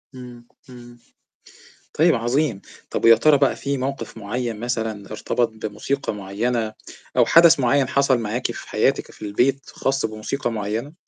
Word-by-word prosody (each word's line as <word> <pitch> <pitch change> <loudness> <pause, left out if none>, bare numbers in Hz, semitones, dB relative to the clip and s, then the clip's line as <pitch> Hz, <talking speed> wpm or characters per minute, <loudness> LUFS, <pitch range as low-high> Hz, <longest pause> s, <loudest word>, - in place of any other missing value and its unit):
امم، 120 -2 -11 0.2
امم 120 -1 -13 1.0
طيب 165 +2 +4
عظيم، 120 -1 0 0.3
طَب - - -3
ويا 115 0 +8
ترى 145 +5 +4
بقى 140 -1 +2
في 140 -1 -3
موقف 135 -1 -4
مُعين 115 +1 -4
مثلًا، 110 -4 -3
ارتبط 115 +2 -1 0.2
بموسيقى 110 +4 -3
مُعينة 110 +3 -2 0.4
أو - - +5
حدث 165 -2 +6
معين 135 +1 +2
حصل 140 -2 +2
معاكِ 115 +3 -2
في - - -10
حياتِك - - 0
في - - -17
البيت 125 +6 +1
خاص 135 -3 -1
بموسيقى 110 +3 -4
معينة؟ 110 +7 -4
120 Hz, 145 wpm, -22 LUFS, 110-135 Hz, 1.0 s, ويا